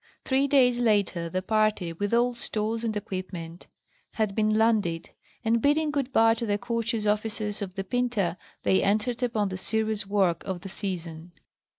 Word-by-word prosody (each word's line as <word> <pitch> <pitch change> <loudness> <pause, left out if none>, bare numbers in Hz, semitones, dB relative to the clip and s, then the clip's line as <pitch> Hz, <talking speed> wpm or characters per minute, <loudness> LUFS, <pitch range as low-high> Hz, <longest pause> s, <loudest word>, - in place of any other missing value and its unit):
Three 270 +1 +2
days 250 -3 +4
later 205 -7 +1
the 185 +2 -2
party, 215 -4 +1
with 205 +4 -3
all 240 +1 +3
stores 225 -1 -2
and 220 -2 -1
equipment, 185 -4 -6 0.5
had 215 -3 0
been 215 +1 +2
landed; 210 -7 +1 0.3
and 230 +1 +2
bidding 300 +3 +2
good 275 -2 -2
bye 225 -2 +5
to 230 +1 -3
the 205 -1 +1
courteous 230 -1 -2
officers 210 0 -1
of 190 -2 -5
the 195 - -2
Pinta, 215 -5 0 0.3
they 190 - +3
entered 220 +5 0
upon 220 -5 0
the 185 -1 -5
serious 220 -1 -1
work 190 -5 +1
of 185 -3 -4
the 195 - -7
season. 175 -4 -5
215 Hz, 170 wpm, -27 LUFS, 190-230 Hz, 0.5 s, bye